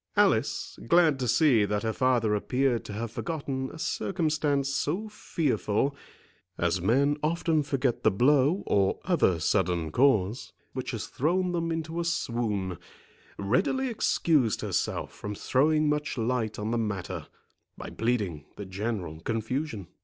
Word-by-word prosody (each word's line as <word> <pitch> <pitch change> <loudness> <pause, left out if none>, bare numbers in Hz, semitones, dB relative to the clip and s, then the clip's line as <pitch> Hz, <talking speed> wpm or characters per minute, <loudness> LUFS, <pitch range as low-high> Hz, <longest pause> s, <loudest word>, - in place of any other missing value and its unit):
Alice, - - +1
glad 165 -4 +4
to 125 - -1
see 125 -2 +4
that 105 +1 -1
her 110 -1 0
father 120 -4 +2
appeared 125 +3 +1
to 105 - -7
have 110 +2 -4
forgotten 135 -3 -3
a - - -10
circumstance 155 -5 0
so 170 +10 -1
fearful, 140 - -1 0.6
(as 85 +1 0
men 140 - +2
often 160 0 +1
forget 135 -3 -1
the - - +4
blow, 140 - +3
or 100 -1 +2
other 145 - +2
sudden 85 -2 +1
cause, 115 - +2 0.2
which 130 -1 -4
has 115 -3 -3
thrown 180 +6 0
them 165 -1 -1
into 165 +1 -3
a - - 0
swoon,) 110 - -2 0.6
readily 185 - +1
excused 155 - +1
herself - - -2
from 105 0 -6
throwing 150 +7 +2
much 150 -1 -1
light 115 -2 -1
on 105 +2 -3
the 120 - +1
matter, 100 -5 -3 0.5
by - - -7
pleading 105 -11 -1
the 100 - -7
general 95 -4 -4
confusion. 115 - -3
125 Hz, 140 wpm, -28 LUFS, 105-155 Hz, 0.6 s, glad